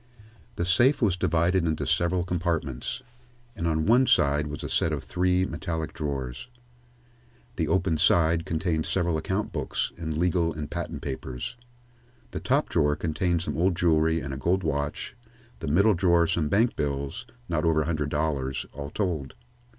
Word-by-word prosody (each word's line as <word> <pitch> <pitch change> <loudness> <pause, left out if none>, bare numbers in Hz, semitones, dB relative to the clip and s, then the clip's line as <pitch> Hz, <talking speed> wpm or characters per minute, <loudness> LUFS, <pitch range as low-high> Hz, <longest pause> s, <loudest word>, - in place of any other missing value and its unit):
The 85 - -1
safe 120 +11 +4
was 105 -7 +2
divided 85 +1 +2
into 80 -3 -1
several 85 +4 +1
compartments, 85 - -2 0.5
and 85 -5 -2
on 80 -1 +1
one 125 +4 +5
side 75 +1 +3
was 75 -1 -6
a - - -3
set - - +1
of - - -3
three 90 +1 +1
metallic 80 -1 -4
drawers. 70 - -4 1.1
The 80 -4 0
open 90 -2 +1
side 85 -1 +4
contained 80 -1 -1
several 85 -3 +1
account 95 +7 -2
books - - -2
and 80 -2 -3
legal 85 -1 +1
and 75 -1 -5
patent - - -4
papers. 65 - -5 0.8
The - - -4
top - - +1
drawer 75 0 +2
contained 85 +2 0
some - - -3
old 90 +3 +2
jewelry 80 -1 +2
and 70 0 -5
a - - -4
gold 90 +7 +1
watch, 75 - -2 0.4
the 80 - -5
middle 100 +9 +4
drawer 85 -1 +3
some 80 -2 0
bank 115 +8 +2
bills, 70 - -3 0.2
not 85 -2 -1
over 80 -2 +3
a - - -6
hundred 75 -3 -1
dollars, 70 -3 -1
all 70 0 -6
told. 80 -7 -2
80 Hz, 165 wpm, -27 LUFS, 75-90 Hz, 1.1 s, one